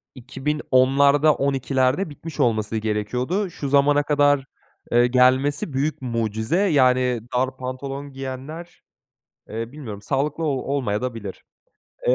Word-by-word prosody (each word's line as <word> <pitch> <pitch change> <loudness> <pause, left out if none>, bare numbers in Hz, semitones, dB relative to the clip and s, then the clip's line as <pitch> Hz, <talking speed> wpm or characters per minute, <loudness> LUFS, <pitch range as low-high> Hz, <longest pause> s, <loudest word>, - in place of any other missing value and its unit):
2010'larda 140 +2 +2
12'lerde 135 +4 0
bitmiş 155 +1 -10
olması 110 -2 +1
gerekiyordu. 125 - -1
Şu 145 -4 -5
zamana 145 +1 +4
kadar, 145 -2 +2 0.5
eee, 120 +1 +5
gelmesi 130 +4 +2
büyük 140 +3 -1
mucize, 115 - -1
yani, 130 - +3 0.2
dar 130 +1 -1
pantolon 135 +2 -6
giyenler, 135 +6 -7 0.7
eee, 115 +2 -5
bilmiyorum 120 -9 -8
sağlıklı 145 +7 -1
o - - +1
olmayadabilir. 125 -6 -3 0.6
Eee, - - +5
135 Hz, 110 wpm, -23 LUFS, 125-145 Hz, 0.7 s, eee